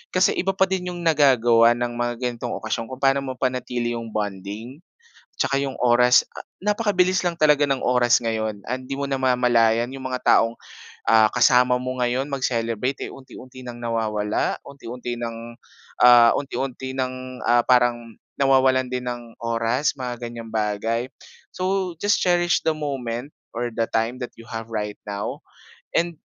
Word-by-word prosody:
Kasi 185 - +4
iba 195 - 0
pa 190 - +3
din 185 -1 -2
yung - - -7
nagagawa 120 -7 +5
ng 120 0 -2
mga 120 0 -1
ganitong 120 -2 -3
okasyon 115 +1 -3
kung 130 +2 -8
paano 135 0 +4
mapanatili 125 -2 -2
yung 115 - -7
bonding, 105 +5 -5 0.6
tsaka 140 - +1
yung 140 -1 -2
oras 125 +1 +5 0.4
napakabilis 195 -3 +1
lang 175 - +1
talaga 150 -3 +4
ng 135 -2 -1
oras 125 -1 +3
ngayon 110 -3 -2
and 130 +1 -3
hindi 135 - -5
mo 140 0 -3
namamalayan 125 -3 +2
yung 135 0 -8
mga 130 -1 -3
taong, 115 +1 +4 0.5
ah, 110 -1 +5
kasama 125 +1 +4
mo 130 0 -4
ngayon 125 +2 0
mag-celebrate 125 -2 -2
eh, - - -8
unti-unti 130 -1 -12
ng 120 -1 -8
nawawala 110 -3 -1
unti-unti 125 -3 -7
ng, 115 -1 -5 0.6
ah, 120 -1 +8
unti-unti 130 -1 -4
ng, 130 -1 -1 0.3
ah, 120 0 +4
parang 120 -2 +2 0.2
nawawalan 130 -1 +3
din 125 0 -3
ng 120 -2 -6
oras 115 +4 0
mga 125 -2 -5
ganyang 115 -1 -8
bagay. 110 +2 -1 0.5
So 185 0 -1
just 205 0 +3
cherish 175 -1 +2
the 160 - +3
moment 135 -4 -4 0.2
or 120 +1 -2
the 115 0 -1
time 115 +2 0
that - - -17
you 115 0 -15
have 115 0 -6
right 105 -1 -3
now 100 -1 -5 0.5
and 170 0 0
125 Hz, 155 wpm, -23 LUFS, 115-135 Hz, 0.6 s, ah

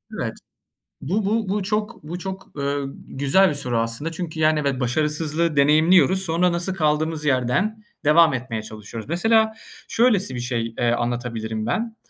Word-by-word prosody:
Evet. - - -3 0.7
Bu 195 +9 -1
bu 215 0 0
bu 205 +1 0
çok 210 +2 -2
bu 170 +4 -6
çok, 190 +1 -6
ııı, 140 -1 -2
güzel 140 +8 +3
bir - - -2
soru 125 -4 -2
aslında. 115 +8 -1
Çünkü, 165 -1 -5
yani, 155 0 +3
evet, 140 -3 -1
başarısızlığı 150 +5 0
deneyimliyoruz. 155 +5 +4
Sonra 180 0 +1
nasıl 175 +2 0
kaldığımız 155 -2 0
yerden 140 - 0 0.2
devam 155 0 +6
etmeye 120 -3 -3
çalışıyoruz. 110 +2 -9
Mesela 220 +6 +3 0.3
şöylesi 215 - +2
bir - - -3
şey, 120 -2 -2
eee, 120 -1 +2
anlatabilirim 120 -2 -2
ben: 220 - -2
155 Hz, 155 wpm, -22 LUFS, 125-185 Hz, 0.7 s, devam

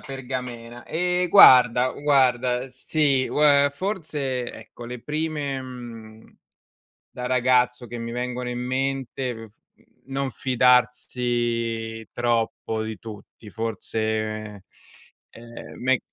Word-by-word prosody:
pergamena. 125 -3 -7
Ehm, 180 +1 0
guarda, 125 - +7
guarda: 130 -3 +1
sì, 135 0 +1
ue 145 -1 +4
forse, 150 - -3
ecco, 115 +2 -12
le 125 0 -7
prime, 150 -3 -3
mhmm, 115 -4 -11 0.8
da 125 - -6
ragazzo, 125 -1 +2
che 120 - -7
mi 115 0 -5
vengono 125 0 -3
in 120 0 -4
mente: 130 0 -2
mhmm, 115 0 -10 0.6
non 135 0 -3
fidarsi 120 -3 0
troppo 115 -2 -1
di 110 -1 -6
tutti. 110 0 -11
Forse, 110 -2 -3 0.6
ehm, 115 0 -12
me 130 0 +2
125 Hz, 100 wpm, -24 LUFS, 115-135 Hz, 0.8 s, guarda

